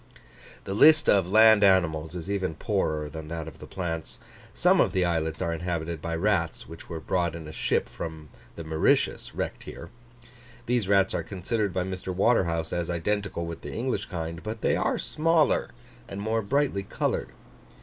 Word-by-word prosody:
The 95 - -4
list 155 +9 +6
of 95 -3 +4
land 110 0 +7
animals 85 -4 +2
is 90 0 -6
even 95 -5 -2
poorer 75 0 -1
than 80 +1 -8
that 80 0 -5
of 80 - -11
the - - -10
plants. 80 -3 -4 0.3
Some - - +4
of - - +1
the 95 -1 +2
islets 80 -2 -1
are 85 - -1
inhabited 85 -1 -3
by 85 +1 -3
rats, 90 -2 0
which 80 0 -11
were 85 -2 -4
brought 85 0 -1
in 80 -2 -8
a - - -7
ship - - 0
from 80 -2 -7 0.3
the 85 - -7
Mauritius, 80 0 +1
wrecked - - -3
here. - - -9 0.7
These 120 -4 0
rats 95 -1 +3
are - - 0
considered 105 +2 -2
by 90 0 -1
Mr. 95 0 -6
Waterhouse 85 -6 +1
as 85 -1 -2
identical 90 +1 -2
with 85 -1 -7
the - - -7
English 125 +3 -2
kind, 85 -2 -5
but 110 +1 -6
they - - +2
are - - 0
smaller, 160 0 +2 0.4
and 100 - -7
more 110 +2 0
brightly 135 -2 0
coloured. 95 - -2
90 Hz, 180 wpm, -27 LUFS, 80-100 Hz, 0.7 s, land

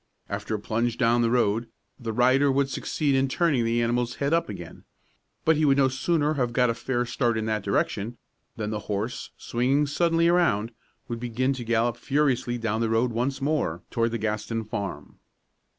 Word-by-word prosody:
After 100 +2 -3
a - - -3
plunge 115 +3 -1
down 120 -1 +3
the 115 - +2
road, 115 -1 +1 0.3
the 115 -3 -3
rider 130 +5 +4
would 135 0 +1
succeed 145 +1 -1
in 135 0 +3
turning 145 -3 +1
the 115 +1 +1
animal's 120 +1 0
head 140 +2 0
up 165 -6 +1
again; 90 -5 -8 0.6
but 160 -1 +4
he 155 - +1
would 140 -2 +4
no 135 -1 +4
sooner 150 +3 +1
have 125 -5 -1
got 125 0 +3
a - - -1
fair 120 +1 -1
start 120 -1 0
in 110 - -1
that 110 -1 -1
direction, 100 +3 -1 0.4
than 105 -1 -3
the 105 - -2
horse, 105 +4 -3
swinging 130 +5 +1
suddenly 165 +3 +2
around, 165 - +2 0.4
would 120 -1 -4
begin 125 +3 0
to 125 -2 -6
gallop 115 0 +1
furiously 130 -2 0
down 110 -1 -1
the 115 - +1
road 115 +2 +2
once 130 +4 -1
more 135 - -1
toward 115 -1 +1
the 115 - -2
Gaston 110 +1 -2
farm. 100 -8 -6
120 Hz, 190 wpm, -26 LUFS, 110-135 Hz, 0.6 s, rider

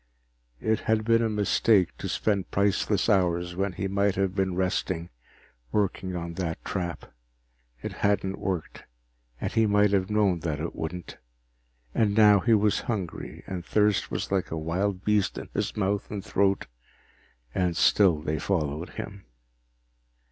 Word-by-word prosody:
It 110 0 +1
had 110 -1 0
been 115 0 +4
a 115 - +1
mistake 105 -2 +2
to - - -4
spend 100 -3 0
priceless 100 0 +1
hours 90 -4 +1
when 95 +1 -1
he 95 +2 -3
might 100 0 +1
have 95 -1 0
been 95 -2 0
resting 90 -2 -1 0.6
working 95 -2 -1
on 85 -1 -4
that 85 -2 -4
trap. 90 -3 -4 0.7
It - - -4
hadn't 100 -1 0
worked, 90 -5 -4 0.5
and - - -2
he 115 -1 +3
might 105 0 +4
have 95 -1 +1
known 105 -4 +2
that 80 -3 -3
it 85 +2 -4
wouldn't. 85 +2 -6 0.8
And 105 -2 +2
now 105 -2 +7
he 115 +4 +4
was 105 0 +2
hungry, 95 -7 -4
and 90 -3 -5
thirst 105 +1 +2
was - - -3
like 95 -2 0
a 80 - -3
wild 90 +5 -2
beast 105 -2 +2
in - - -7
his - - -2
mouth 100 -1 0
and 100 -2 -5
throat, 100 0 +1 0.9
and 90 -2 0
still 85 -7 +4
they 75 -1 -1
followed 80 -2 -1
him. 100 -1 -7
95 Hz, 155 wpm, -27 LUFS, 90-105 Hz, 0.9 s, now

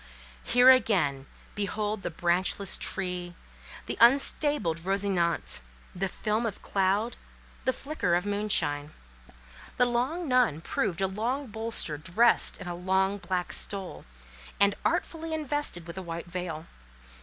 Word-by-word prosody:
Here 245 +2 +7
again—behold 205 - -1
the - - -3
branchless 175 +3 0
tree, 180 -2 -2 0.5
the - - -5
unstabled 270 - +4
Rosinante; 185 - 0 0.3
the 195 +2 -1
film 215 +4 -1
of 205 - -7
cloud, 200 +4 0 0.5
the 260 - +3
flicker 270 - -1
of 180 +2 0
moonshine. 200 -8 0 0.8
The 245 - +5
long 255 +8 -1
nun 250 - +2
proved 175 +2 -2
a 190 - +3
long 235 +9 -2
bolster 220 - -1
dressed 215 +10 +3
in - - -8
a 175 - -3
long 190 +3 0
black 185 -2 -3
stole, 195 -2 -5 0.5
and 200 0 +5
artfully 325 -1 -1
invested 290 - -2
with 170 +2 -7
a - - -5
white 170 -1 -6
veil. 175 -3 -5
195 Hz, 125 wpm, -28 LUFS, 175-235 Hz, 0.8 s, Here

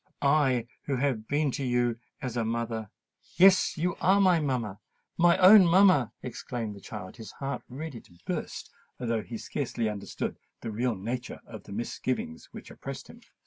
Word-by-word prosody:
I 140 -4 +3 0.2
who 140 - 0
have 125 -5 -1
been 145 -1 +1
to 140 - -3
you 120 -2 +1 0.2
as 125 -2 -3
a 120 - +1
mother——" 115 -1 -2 0.5
"Yes—you 180 -2 +4
are 195 +2 +5
my 185 -4 +5
mamma—my 135 - 0
own 190 0 +9
mamma," 175 - +5
exclaimed 115 -3 -5
the 100 - -12
child, 95 +2 -8
his 110 -2 -9
heart 135 -1 -4
ready 135 -1 -7
to 85 - -21
burst, - - -4 0.3
although 115 -2 -1
he 115 - -7
scarcely 120 -2 -3
understood 105 -2 -4 0.2
the 115 - -4
real 120 +2 0
nature 120 +5 -5
of - - -10
the - - -11
misgivings 115 -5 -3
which - - -10
oppressed - - -8
him. - - -13
125 Hz, 160 wpm, -28 LUFS, 115-150 Hz, 0.5 s, own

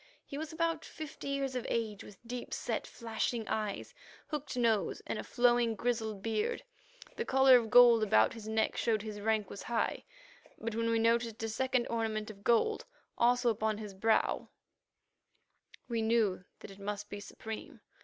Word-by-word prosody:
He - - -8
was 315 -1 -5
about 330 0 -1
fifty 310 -4 -8
years 275 -1 -1
of 250 - -2
age, 220 -3 -2
with 200 - -13
deep 245 0 -4
set - - -3
flashing 230 0 -3
eyes, 210 -2 -3 0.4
hooked 295 -4 -4
nose, 225 -6 +1
and 215 - -3
a - - -4
flowing, 240 -2 +3
grizzled 220 -3 -2
beard. 225 - -1 0.5
The 465 - 0
collar 265 - +6
of 230 -2 -1
gold 240 -1 +8
about 110 - +4
his 225 -2 -9
neck 220 0 +1
showed 220 -3 +1
that - - -10
his 210 -1 -6
rank 215 -2 0
was 200 - -7
high, 235 -1 -1 0.5
but 230 0 -4
when 230 +1 0
we 230 - +2
noticed 230 0 +1
a 225 - -1
second 255 +2 0
ornament 220 -2 -2
of 200 -1 -16
gold, 240 - +2 0.3
also 245 0 +3
upon 220 -1 -1
his 210 -2 -7
brow, 220 +4 +1 1.4
we 230 -2 -1
knew 220 -5 +1 0.2
that - - -9
it 195 - -13
must 205 +1 -4
be 205 - -7
supreme. 220 +2 -8
225 Hz, 175 wpm, -32 LUFS, 215-245 Hz, 1.4 s, gold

